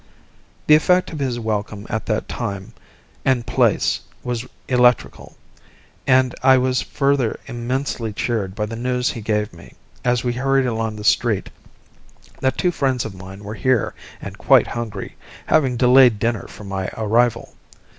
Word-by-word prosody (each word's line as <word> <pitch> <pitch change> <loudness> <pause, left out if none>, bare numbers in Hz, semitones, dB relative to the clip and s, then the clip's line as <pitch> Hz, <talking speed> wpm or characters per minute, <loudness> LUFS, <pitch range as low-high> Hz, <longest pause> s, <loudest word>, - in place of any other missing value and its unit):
The 150 - +6
effect 180 +4 +3
of 155 - -5
his 130 -3 -1
welcome 105 -2 -3
at 110 - -4
that 110 -1 -1
time 100 -2 -5 0.5
and 130 -3 +1
place - - +2 0.2
was 125 0 -3 0.2
electrical, 125 -1 +1 0.7
and 130 -1 +4
I 130 0 +6
was 130 -1 +1
further 135 -1 0
immensely 120 -1 -3
cheered 100 -3 -2
by 105 - -1
the 110 +2 -6
news 125 +1 -1
he 115 - -7
gave 105 0 -1
me, 85 - -15 0.3
as 125 -1 +1
we 120 -1 0
hurried 135 +1 +1
along 110 -2 -2
the 105 - -8
street, 110 -1 +1 0.9
that 130 0 0
two 180 - +2
friends 130 -6 0
of 110 - -6
mine 95 +1 -11
were 105 +1 -6
here 125 +1 +1 0.3
and - - -9
quite - - +5
hungry, 115 -4 -6 0.3
having 135 -6 +2
delayed 125 -2 +6
dinner 115 0 -1
for - - -12
my 95 -1 -3
arrival. 115 +1 +1
120 Hz, 155 wpm, -21 LUFS, 110-130 Hz, 0.9 s, The